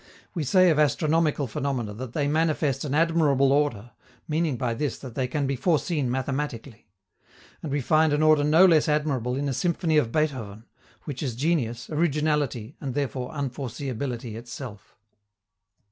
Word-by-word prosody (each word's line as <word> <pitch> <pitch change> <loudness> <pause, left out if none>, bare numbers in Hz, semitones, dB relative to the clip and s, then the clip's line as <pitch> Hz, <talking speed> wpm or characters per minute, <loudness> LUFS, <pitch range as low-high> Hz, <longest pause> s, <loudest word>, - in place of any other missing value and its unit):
We 165 - -2
say 185 +5 +5
of 155 - +1
astronomical 150 +1 +2
phenomena 125 -3 -3
that 120 +2 -7
they 145 -2 0
manifest 155 -2 +1
an 145 -1 -2
admirable 150 -4 +3
order, 125 -6 0 0.4
meaning 155 -3 0
by 120 -2 -1
this 140 +2 -2
that 130 -4 -9
they 130 +1 -1
can 145 +2 -1
be 135 0 -1
foreseen 150 -1 0
mathematically. 130 -2 -4 0.7
And 155 - -5
we 145 0 0
find 155 +4 +3
an 150 +1 +2
order 155 -1 +5
no 160 +5 +6
less 165 -3 +4
admirable 140 -5 0
in 140 +2 -2
a 135 - -1
symphony 165 +1 0
of 120 -6 +2
Beethoven, 125 -9 -2 0.4
which 140 -4 -6
is 130 -6 -3
genius, 125 -5 -1
originality, 150 -6 0
and 130 -3 -4
therefore 130 -3 -2
unforeseeability 130 -3 -4
itself. 115 -1 -9
140 Hz, 155 wpm, -25 LUFS, 125-155 Hz, 0.7 s, no